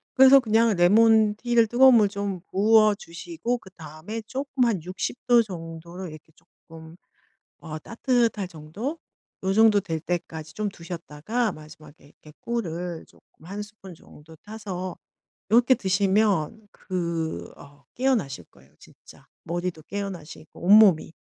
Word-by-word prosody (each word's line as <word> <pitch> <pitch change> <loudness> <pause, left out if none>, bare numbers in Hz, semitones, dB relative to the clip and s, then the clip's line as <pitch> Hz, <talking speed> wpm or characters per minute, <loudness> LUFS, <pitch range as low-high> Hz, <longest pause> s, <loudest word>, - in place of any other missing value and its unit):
그래서 265 +1 +8
그냥 225 -2 +2
레몬 215 +4 +4
티를 235 0 +2
뜨거운 255 +2 +6
물 215 -3 +5
좀 200 -2 -4
부어주시고 215 - +1
그다음에 180 +2 -9
쪼끔 270 0 -1
한 215 -7 0
60 185 +6 -4
도 240 -1 +6
정도로 170 -2 -8
이렇게 155 0 -13 0.4
쪼끔 160 0 -12 0.6
어 155 -1 -7
따뜻할 230 - 0
정도 185 - -6 0.4
요 190 0 0
정도 220 -1 +5
될 165 -5 -4
때까지 160 -3 -5
좀 215 +3 -3
두셨다가 175 +5 -4
마지막에 155 -1 -15
이렇게 150 +1 -18
꿀을 175 -7 -4
쪼끔 155 - -23
1 200 +4 -6
스푼 205 -3 -11
정도 155 +1 -17
타서 190 -2 -7 0.5
이렇게 245 +4 +5
드시면 200 -1 0
그 170 -3 -4
어 145 0 -17
깨어나실 225 - -1
거예요 65 +2 -23
진짜. - - -18 0.2
머리도 175 -1 -4
깨어나시고 180 -5 -8
온몸이. 190 -4 +5
190 Hz, 275 characters per minute, -25 LUFS, 165-220 Hz, 0.6 s, 그래서